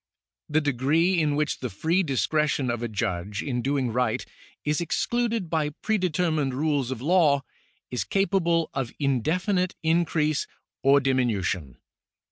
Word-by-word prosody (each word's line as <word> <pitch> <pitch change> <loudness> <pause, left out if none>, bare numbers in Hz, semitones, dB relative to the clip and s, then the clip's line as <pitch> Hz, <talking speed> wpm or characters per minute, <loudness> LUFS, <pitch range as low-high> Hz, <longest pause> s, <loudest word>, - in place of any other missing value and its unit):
The 155 +1 +2
degree 150 +6 +2
in 150 -2 +1
which 150 0 -1
the 125 - -3
free 160 - +1
discretion 145 - 0
of 120 -1 -3
a 120 - -1
judge 100 -1 -3
in 125 -4 -2
doing 135 -3 0
right 125 +1 0 0.4
is 150 +2 +1
excluded 230 +4 0
by 160 -2 0
prede 205 -4 +1
termined 155 -5 0
rules 145 -2 0
of 130 -2 -5
law, 155 -4 +4 0.5
is 125 -6 -1
capable 170 - +1
of 135 -4 -2
indefinite 175 - 0
increase 160 -2 +1 0.3
or 140 +1 +5
diminution. 105 - 0
145 Hz, 135 wpm, -26 LUFS, 125-170 Hz, 0.5 s, or